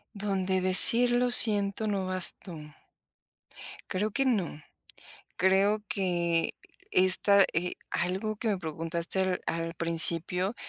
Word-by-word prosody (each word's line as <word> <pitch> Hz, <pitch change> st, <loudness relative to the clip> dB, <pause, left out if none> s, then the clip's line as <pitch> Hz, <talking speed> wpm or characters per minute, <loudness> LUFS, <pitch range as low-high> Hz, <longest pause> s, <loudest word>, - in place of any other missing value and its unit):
Donde 195 Hz, -2 st, -4 dB
decir: 230 Hz, +6 st, +7 dB
"Lo 245 Hz, 0 st, -1 dB
siento", 210 Hz, -2 st, +5 dB
no 200 Hz, -2 st, -4 dB
bastó. 185 Hz, -1 st, -2 dB, 1.3 s
Creo 210 Hz, +3 st, -5 dB
que 270 Hz, -, -3 dB
no. 190 Hz, -, -4 dB, 0.8 s
Creo 195 Hz, +3 st, -1 dB
que 170 Hz, -4 st, -4 dB, 0.4 s
esta 190 Hz, +2 st, +2 dB
eh, 175 Hz, +2 st, -5 dB, 0.2 s
algo 195 Hz, +4 st, -5 dB
que 225 Hz, +2 st, -6 dB
me 205 Hz, -, -2 dB
preguntaste 165 Hz, +2 st, -6 dB
al 185 Hz, -1 st, -3 dB
al 165 Hz, 0 st, -6 dB
principio, 170 Hz, +4 st, -2 dB
190 Hz, 110 wpm, -25 LUFS, 170-205 Hz, 1.3 s, decir